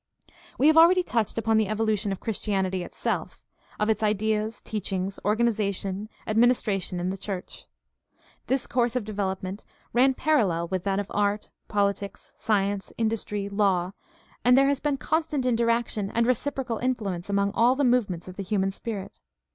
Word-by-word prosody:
We 275 Hz, -, +2 dB
have 315 Hz, +1 st, +6 dB
already 355 Hz, +3 st, +7 dB
touched 230 Hz, -, -1 dB
upon 225 Hz, 0 st, +2 dB
the 220 Hz, -2 st, +2 dB
evolution 215 Hz, -1 st, 0 dB
of 195 Hz, -, -3 dB
Chris 220 Hz, -3 st, -3 dB
tianity 190 Hz, -3 st, -1 dB
itself, -, -, -4 dB, 0.4 s
of 210 Hz, -, +1 dB
its 220 Hz, -1 st, +1 dB
ideas, 215 Hz, +1 st, 0 dB
teachings, 195 Hz, -2 st, -3 dB
organization, 210 Hz, -2 st, 0 dB, 0.2 s
adminis 235 Hz, +3 st, +3 dB
tration 195 Hz, -3 st, -1 dB
in 180 Hz, +1 st, -1 dB
the 195 Hz, -, -4 dB
church. 190 Hz, -1 st, -6 dB, 0.8 s
This 265 Hz, 0 st, 0 dB
course 240 Hz, -1 st, 0 dB
of 245 Hz, -4 st, -1 dB
development 195 Hz, -1 st, -3 dB, 0.3 s
ran 260 Hz, +2 st, +4 dB
parallel 195 Hz, -, +1 dB
with 185 Hz, 0 st, -2 dB
that 195 Hz, 0 st, +1 dB
of 205 Hz, +2 st, -5 dB
art, 205 Hz, 0 st, 0 dB, 0.2 s
politics, 200 Hz, -1 st, -2 dB
science, 200 Hz, -2 st, 0 dB
industry, 215 Hz, -3 st, -1 dB
law, 195 Hz, -3 st, +1 dB, 0.5 s
and 250 Hz, +1 st, +6 dB
there 275 Hz, +1 st, +5 dB
has 280 Hz, -1 st, +1 dB
been 290 Hz, -2 st, 0 dB
constant 305 Hz, 0 st, -1 dB
interaction 230 Hz, -4 st, +1 dB
and 235 Hz, +2 st, +1 dB
reciprocal 255 Hz, -1 st, -1 dB
influence 205 Hz, -8 st, -2 dB
among 200 Hz, 0 st, +1 dB
all 240 Hz, +3 st, +4 dB
the 285 Hz, -, 0 dB
movements 220 Hz, -10 st, +1 dB
of 185 Hz, -, -9 dB
the 200 Hz, -, -3 dB
human 195 Hz, 0 st, 0 dB
spirit. 200 Hz, -1 st, -6 dB
210 Hz, 160 wpm, -26 LUFS, 195-235 Hz, 0.8 s, already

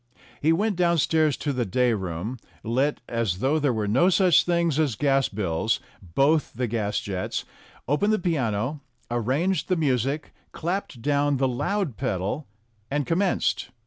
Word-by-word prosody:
He 155 Hz, -, +4 dB
went 200 Hz, +3 st, +1 dB
downstairs 160 Hz, -4 st, +2 dB
to 145 Hz, -, -2 dB
the 125 Hz, -2 st, 0 dB
day 120 Hz, +4 st, +2 dB
room, 95 Hz, +4 st, -4 dB, 0.2 s
lit 130 Hz, +6 st, 0 dB
(as 115 Hz, -6 st, -1 dB
though 135 Hz, +9 st, +1 dB
there 145 Hz, -3 st, +2 dB
were 110 Hz, -3 st, -1 dB
no 130 Hz, -, +4 dB
such 185 Hz, -2 st, +4 dB
things 170 Hz, -3 st, +1 dB
as 145 Hz, -8 st, +1 dB
gas 135 Hz, +2 st, +2 dB
bills) 100 Hz, +1 st, -1 dB, 0.2 s
both 135 Hz, -, +1 dB
the 125 Hz, +2 st, -1 dB
gas 105 Hz, -3 st, -1 dB
jets, 95 Hz, -2 st, -3 dB, 0.4 s
opened 175 Hz, -, +2 dB
the 215 Hz, -, +3 dB
piano, 140 Hz, -, -1 dB, 0.3 s
arranged 140 Hz, -, 0 dB
the 185 Hz, -, +3 dB
music, 140 Hz, 0 st, 0 dB, 0.2 s
clapped 170 Hz, -, -3 dB
down 145 Hz, 0 st, +2 dB
the 135 Hz, 0 st, +2 dB
loud 145 Hz, -, -1 dB
pedal, 115 Hz, +3 st, -2 dB, 0.4 s
and 145 Hz, 0 st, 0 dB
commenced. 180 Hz, +7 st, 0 dB
135 Hz, 150 wpm, -25 LUFS, 115-160 Hz, 0.4 s, He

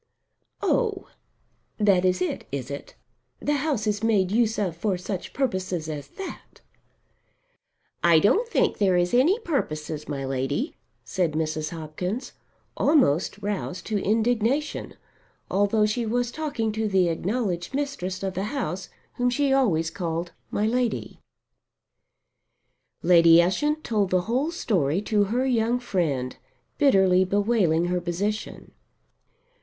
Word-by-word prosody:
"Oh 430 Hz, -6 st, 0 dB, 0.7 s
that 195 Hz, -4 st, +3 dB
is 185 Hz, 0 st, +2 dB
it, -, -, -4 dB
is 135 Hz, -1 st, -4 dB
it? 140 Hz, -, -7 dB, 0.4 s
The 295 Hz, 0 st, 0 dB
house 275 Hz, -7 st, -1 dB
is 210 Hz, -1 st, 0 dB
made 205 Hz, -5 st, +2 dB
use 225 Hz, 0 st, +2 dB
of 185 Hz, -6 st, -1 dB
for 190 Hz, +2 st, -1 dB
such 180 Hz, +1 st, -5 dB
purposes 185 Hz, -, -2 dB
as 145 Hz, -3 st, -5 dB
that!" 390 Hz, -, -9 dB, 1.4 s
"I 170 Hz, -1 st, +6 dB
don't 405 Hz, -, +3 dB
think 470 Hz, -1 st, +1 dB
there 190 Hz, -3 st, +3 dB
is 175 Hz, +3 st, +1 dB
any 290 Hz, -, +4 dB
purposes, 155 Hz, -, -3 dB
my 140 Hz, -2 st, -3 dB
Lady," 135 Hz, -, -2 dB, 0.3 s
said 180 Hz, -5 st, 0 dB
Mrs. 155 Hz, 0 st, -2 dB
Hopkins, 170 Hz, -, -5 dB, 0.4 s
almost 230 Hz, -, +2 dB
roused 200 Hz, -3 st, -3 dB
to 210 Hz, -3 st, -1 dB
indignation, 235 Hz, +6 st, 0 dB, 0.6 s
although 205 Hz, +2 st, +3 dB
she 225 Hz, +2 st, -1 dB
was 245 Hz, +2 st, 0 dB
talking 285 Hz, -7 st, -2 dB
to 220 Hz, 0 st, -1 dB
the 190 Hz, -3 st, +3 dB
acknowledged 180 Hz, +3 st, -2 dB
mistress 200 Hz, -10 st, -3 dB
of 190 Hz, -1 st, -2 dB
the 190 Hz, +2 st, -2 dB
house 195 Hz, -, -3 dB, 0.3 s
whom 245 Hz, 0 st, +2 dB
she 275 Hz, +2 st, +1 dB
always 170 Hz, -12 st, +2 dB
called 170 Hz, -1 st, -3 dB, 0.2 s
"my 210 Hz, -, 0 dB
lady." 240 Hz, +1 st, -1 dB, 1.8 s
Lady 170 Hz, -1 st, +7 dB
Ushant 295 Hz, -, +1 dB
told 210 Hz, -4 st, 0 dB
the 185 Hz, -1 st, +2 dB
whole 250 Hz, -, 0 dB
story 185 Hz, -, 0 dB
to 210 Hz, -1 st, +2 dB
her 245 Hz, +6 st, 0 dB
young 240 Hz, -1 st, +1 dB
friend, 155 Hz, -, -1 dB, 0.4 s
bitterly 190 Hz, -10 st, +5 dB
bewailing 195 Hz, -4 st, +2 dB
her 180 Hz, 0 st, -1 dB
position. 200 Hz, +5 st, -3 dB
200 Hz, 130 wpm, -25 LUFS, 175-245 Hz, 1.8 s, Lady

